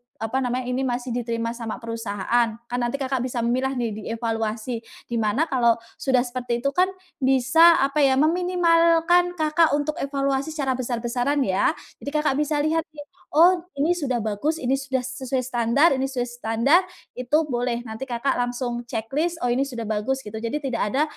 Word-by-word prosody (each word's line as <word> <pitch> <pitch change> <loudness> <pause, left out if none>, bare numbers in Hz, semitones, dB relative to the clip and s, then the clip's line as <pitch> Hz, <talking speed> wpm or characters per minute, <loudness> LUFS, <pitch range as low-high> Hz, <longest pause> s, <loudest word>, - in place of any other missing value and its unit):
apa 225 +4 -2
namanya, 250 0 -1
"ini 250 +1 -1
masih 250 -1 -2
diterima 230 -1 -2
sama 230 -2 -5
perusahaan." 230 0 -1 0.2
Kan 245 - -1
nanti 240 +2 -1
Kakak 265 -1 -1
bisa 250 -1 -3
memilah 255 +3 0
nih, 235 -2 -1
dievaluasi, 225 +1 -3 0.3
di 235 - 0
mana 215 +7 +1
kalau 240 -5 +3 0.2
sudah 260 -2 +2
seperti 245 -1 -3
itu 275 - +2
kan 365 +4 +3 0.3
bisa, 270 +6 +5
apa 275 +2 -1
ya, 270 -2 +4
meminimalkan 340 +1 +3
Kakak 310 0 +3
untuk 295 +1 -2
evaluasi 275 0 -1
secara 275 -4 0
besar-besaran 245 +3 -1
ya. 190 +8 +2 0.3
Jadi - - -4
Kakak 300 -3 +2
bisa 300 0 0
lihat 320 +1 +1
nih, 295 - -8 0.3
"Oh, 350 +3 +6 0.2
ini 300 +5 +2
sudah 275 -8 -1
bagus, 220 +9 -1
ini 265 -3 0
sudah 265 -2 -2
se 255 +1 -6
sesuai 255 0 0
standar, 245 +5 +3
ini 265 0 0
sesuai 250 -2 -3
standar." 245 +9 +3 0.3
Itu 250 +4 0
boleh, 240 -1 -1
nanti 220 +3 -6
Kakak 245 +3 0
langsung 245 0 -2
ceklis, 275 +9 -1
"Oh, 245 - +2
ini 255 +3 +2
sudah 240 -4 -5
bagus." 220 +5 -1
Gitu, 215 +1 -6
jadi 230 +5 -2
tidak 255 -4 -2
ada 280 - +3
255 Hz, 175 wpm, -24 LUFS, 235-285 Hz, 0.3 s, Oh